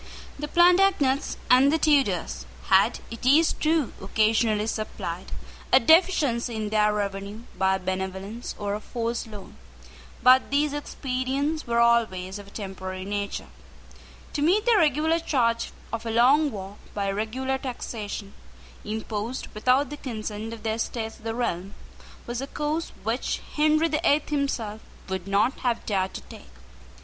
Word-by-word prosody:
The 295 - -3
Plantagenets 350 -5 +3
and 260 +3 +6
the 320 - +3
Tudors 275 - +1 0.2
had, - - +4
it 230 - -8
is 295 +6 +5
true, 310 -4 0
occasionally 215 +1 +2
supplied 200 -5 -4 0.4
a - - +8
deficiency 275 -6 +3
in 215 -1 -2
their 210 0 +3
revenue 200 +1 -3
by 190 0 +2
a - - -3
benevolence 190 +4 -4
or 205 -1 -2
a 210 - -2
forced 230 +1 -3
loan: 210 -3 -11 0.7
but 255 +1 +6
these 285 +1 +1
expedients 280 +1 -2
were 235 0 +1
always 210 -5 +2
of 200 - -11
a - - -12
temporary 190 -2 -6
nature. 200 0 -3 0.9
To 290 - -2
meet 380 +8 +3
the 480 - +5
regular 320 -1 +3
charge 230 -7 0 0.2
of 230 0 -3
a 230 - -4
long 265 +7 +4
war 200 -3 -8 0.2
by 200 -1 0
regular 255 +6 -2
taxation, 215 -6 -5 0.5
imposed 220 +3 -4
without 255 +6 +2
the 295 - -5
consent 220 -4 -5
of 230 -1 -9
the 220 - 0
Estates 225 0 -3
of - - -20
the 225 0 -3
realm, 195 -5 -2 0.5
was 240 +1 -4
a 270 - -4
course 300 +3 -2
which 225 +4 -1
Henry 310 +2 +3
the 305 -2 -1
Eighth 290 +1 +2
himself 240 -7 -2 0.3
would 190 0 -4
not 205 +6 +2
have 240 -2 -1
dared 190 -2 -1
to - - -5
take. - - -13
230 Hz, 150 wpm, -26 LUFS, 205-280 Hz, 0.9 s, a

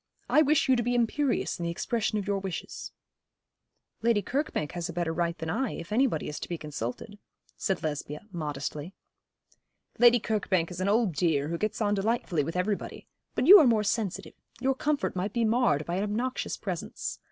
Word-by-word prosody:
I 305 - +5
wish 305 0 +3
you 260 - +5
to 240 - +1
be 245 +1 0
imperious 245 -1 0
in - - -3
the 170 - -1
expression 215 +5 -1
of 205 - -2
your 200 -1 0
wishes.' 190 -3 -6 1.1
'Lady 230 -3 +2
Kirkbank 265 - -2
has 175 -1 -4
a - - -5
better 170 -1 -1
right 170 0 -1
than 160 -1 -3
I, 245 +4 -1
if 170 - -8
anybody 230 - +1
is 150 - -5
to - - -7
be 170 - -2
consulted,' 150 - -6 0.4
said 190 -2 -2
Lesbia, 150 -1 -3
modestly. 150 +1 -4 1.0
'Lady 240 0 +7
Kirkbank 190 -6 0
is 180 +1 -5
an 190 - +1
old 215 -3 +2
dear, 150 -2 +1
who 170 - -2
gets 215 +1 -2
on 205 -1 +2
delightfully 200 -6 0
with 165 +4 -5
everybody. 195 +3 -2 0.3
But - - +1
you 395 +6 +11
are 300 - +6
more 220 -3 +3
sensitive. 210 -2 -2 0.3
Your 265 +1 +2
comfort 290 -2 -1
might 190 +3 -2
be 235 -1 +1
marred 220 - +2
by 175 +1 -2
an 195 - 0
obnoxious 235 +5 -2
presence. - - -5
200 Hz, 190 wpm, -28 LUFS, 170-235 Hz, 1.1 s, you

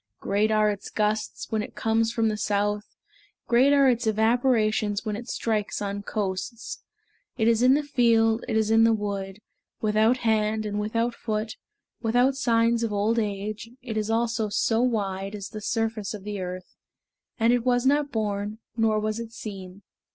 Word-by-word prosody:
Great 205 +2 +1
are 215 -1 +3
its 200 - -7
gusts 210 0 -1
When 220 -1 +1
it - - -8
comes 225 0 +1
from 225 -1 +1
the 215 - 0
south; 205 0 -1 0.5
Great 250 +4 +4
are 280 -1 +5
its 245 -2 +1
evaporations 220 -2 +2
When 210 -1 -2
it 240 +3 -7
strikes 215 -3 -1
on 200 0 -3
coasts. 205 +3 -4 0.6
It 220 -2 +2
is 230 0 +3
in 255 +2 +6
the 295 - 0
field, 230 -4 +3
it 220 - 0
is 220 0 +1
in 225 0 +6
the 225 0 +5
wood, 200 -2 -4 0.4
Without 220 +3 +3
hand 215 -1 +1
and 210 0 -2
without 230 +3 -1
foot, 215 -1 -3 0.5
Without 245 +4 +2
signs 230 -2 +2
of 230 -2 -1
old 210 +3 +1
age, 210 +1 -4
It 235 -4 -5
is 215 0 -1
also 225 -1 0
so 225 +2 +1
wide, 200 -5 -1
As 200 -1 -6
the 215 -2 -7
surface 225 -1 -2
of 200 - -10
the 205 -1 -5
earth; 185 0 -6 0.7
And 230 +2 +4
it 245 -1 +1
was 245 0 +2
not 285 +1 +2
born, 210 -1 -2 0.2
Nor 220 -2 +2
was 215 +1 -2
it 230 -1 -6
seen. 195 -3 -9
220 Hz, 175 wpm, -26 LUFS, 210-230 Hz, 0.7 s, in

